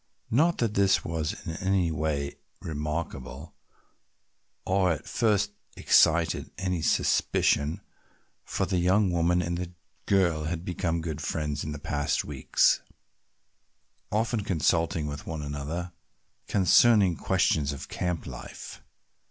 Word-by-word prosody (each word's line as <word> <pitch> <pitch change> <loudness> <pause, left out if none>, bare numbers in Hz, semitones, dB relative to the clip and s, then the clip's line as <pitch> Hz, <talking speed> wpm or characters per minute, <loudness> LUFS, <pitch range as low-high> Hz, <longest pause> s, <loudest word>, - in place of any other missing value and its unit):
Not 160 +9 +3
that 115 -3 0
this 100 -1 +3
was 80 -1 -3
in - - -3
any 95 -3 +1
way 75 -2 -2 0.2
remarkable 75 -2 -5 1.1
or 95 -1 +2
at 75 - -8
first 105 -3 +1 0.3
excited 80 0 +3
any 90 -3 -1
suspicion, 75 0 +1 0.6
for - - -2
the 90 - 0
young 95 +2 +3
woman 85 +1 +2
and 85 +1 -4 0.3
girl 85 -6 +2
had 85 +2 -3
become 85 -1 -1
good 80 -2 -4
friends 75 -1 -2
in 75 - -4
the 75 - -5
past 70 0 -1
weeks, 70 -3 +2 1.3
often 110 0 0
consulting 85 -4 +1
with 75 0 -6
one 80 -2 -4
another 75 +5 -4 0.6
concerning 100 -1 +5
questions 75 -1 +1
of 70 0 -7
camp 90 -3 -3
life. - - -9
85 Hz, 120 wpm, -27 LUFS, 75-95 Hz, 1.3 s, concerning